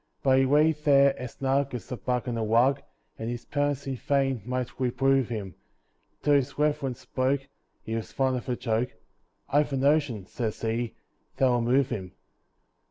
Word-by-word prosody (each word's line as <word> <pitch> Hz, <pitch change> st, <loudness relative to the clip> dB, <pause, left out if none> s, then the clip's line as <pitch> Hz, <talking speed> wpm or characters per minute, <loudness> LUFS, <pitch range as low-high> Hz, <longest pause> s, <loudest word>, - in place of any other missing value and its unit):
But 130 Hz, -2 st, +5 dB
he 135 Hz, -, +4 dB
lay 150 Hz, +4 st, +4 dB
there 140 Hz, -2 st, +4 dB
as 125 Hz, -2 st, -6 dB
snug 135 Hz, 0 st, 0 dB
as 125 Hz, -, -8 dB
a -, -, -1 dB
bug 125 Hz, +3 st, -2 dB
in 120 Hz, -, -1 dB
a 115 Hz, -, -1 dB
rug, 120 Hz, +6 st, +3 dB, 0.4 s
And 115 Hz, -, -3 dB
his 120 Hz, -1 st, -5 dB
parents 145 Hz, -1 st, -1 dB
in 135 Hz, -2 st, -3 dB
vain 135 Hz, -2 st, 0 dB
might 125 Hz, 0 st, -3 dB
reprove 135 Hz, 0 st, +2 dB
him, 105 Hz, -6 st, -4 dB, 0.7 s
Till 145 Hz, -, +4 dB
his 140 Hz, -1 st, +1 dB
reverence 145 Hz, -4 st, 0 dB
spoke 130 Hz, +1 st, 0 dB, 0.4 s
(he 110 Hz, -, -5 dB
was 115 Hz, -, -4 dB
fond 130 Hz, -1 st, +1 dB
of 125 Hz, +1 st, -5 dB
a 125 Hz, -, +1 dB
joke) 120 Hz, 0 st, -1 dB, 0.6 s
"I've 145 Hz, 0 st, +2 dB
a -, -, +1 dB
notion," 140 Hz, -7 st, +2 dB
says 110 Hz, +1 st, -4 dB
he, 115 Hz, +1 st, -2 dB, 0.4 s
"that'll 125 Hz, -2 st, +3 dB
move 130 Hz, +3 st, +2 dB
him." 95 Hz, -3 st, -4 dB
130 Hz, 175 wpm, -27 LUFS, 120-140 Hz, 0.7 s, But